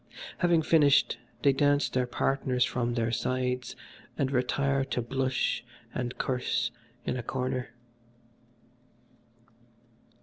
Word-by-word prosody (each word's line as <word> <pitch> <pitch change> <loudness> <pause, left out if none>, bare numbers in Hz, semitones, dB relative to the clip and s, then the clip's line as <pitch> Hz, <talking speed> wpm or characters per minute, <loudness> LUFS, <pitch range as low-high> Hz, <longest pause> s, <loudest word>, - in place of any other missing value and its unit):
Having 170 -2 +3
finished 150 -3 +4 0.2
they 140 - +5
dash 145 +1 +2
their 125 -1 +1
partners 125 -1 +1
from 120 -1 -1
their 115 -1 0
sides 125 +1 -1 0.4
and 135 -1 0
retire 135 +1 +1
to 135 - -2
blush 130 +2 0 0.3
and 125 0 -3
curse 125 -1 0 0.3
in - - -1
a - - -2
corner. 125 +1 -2
130 Hz, 105 wpm, -29 LUFS, 125-140 Hz, 0.4 s, they